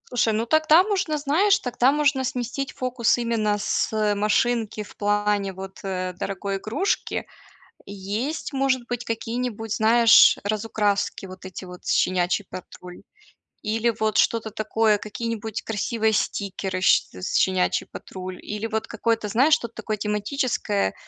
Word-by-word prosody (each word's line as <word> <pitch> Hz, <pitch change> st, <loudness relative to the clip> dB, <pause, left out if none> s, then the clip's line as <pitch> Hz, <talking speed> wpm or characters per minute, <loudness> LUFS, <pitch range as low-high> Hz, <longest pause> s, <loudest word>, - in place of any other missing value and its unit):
Слушай, 235 Hz, -3 st, +1 dB
ну 220 Hz, +2 st, 0 dB
тогда 315 Hz, +6 st, +5 dB
можно 375 Hz, -7 st, -1 dB
знаешь, 335 Hz, +8 st, +3 dB
тогда 250 Hz, -1 st, +2 dB
можно 285 Hz, -2 st, +2 dB
сместить 255 Hz, +1 st, -3 dB
фокус 250 Hz, -3 st, +1 dB
именно 225 Hz, -3 st, 0 dB
с 210 Hz, +1 st, 0 dB
машинки 215 Hz, +1 st, 0 dB
в 205 Hz, -, -15 dB
плане, 205 Hz, -1 st, 0 dB
вот, 190 Hz, +1 st, -9 dB
э, 185 Hz, -1 st, -3 dB
дорогой 195 Hz, +2 st, -3 dB
игрушки. 225 Hz, -, -2 dB, 0.6 s
Есть 210 Hz, +11 st, -4 dB
может 265 Hz, -2 st, +1 dB
быть 245 Hz, 0 st, -4 dB
какие-нибудь, 225 Hz, -1 st, -3 dB
знаешь, 230 Hz, +1 st, +6 dB
разукраски, 205 Hz, -1 st, -1 dB
вот 185 Hz, 0 st, -11 dB
эти 185 Hz, 0 st, -8 dB
вот 180 Hz, 0 st, -11 dB
"Щенячий 185 Hz, +2 st, +1 dB
патруль", 180 Hz, 0 st, -10 dB, 0.6 s
или 225 Hz, +2 st, +1 dB
вот 215 Hz, -1 st, +1 dB
что-то 225 Hz, -1 st, +2 dB
такое, 215 Hz, 0 st, +1 dB
какие-нибудь 225 Hz, 0 st, -4 dB
красивые 220 Hz, 0 st, 0 dB
стикеры 195 Hz, -3 st, -2 dB
щ -, -, +4 dB, 0.2 s
"Щенячий 185 Hz, 0 st, +1 dB
патруль", 185 Hz, -1 st, -8 dB
или 210 Hz, +1 st, -4 dB
вот 220 Hz, -1 st, -2 dB
какое-то, 225 Hz, -1 st, -1 dB
знаешь, 265 Hz, +9 st, +4 dB
что-то 235 Hz, -7 st, +1 dB
такое 215 Hz, -1 st, -3 dB
тематическое, 210 Hz, -, -1 dB
220 Hz, 130 wpm, -24 LUFS, 200-245 Hz, 0.6 s, знаешь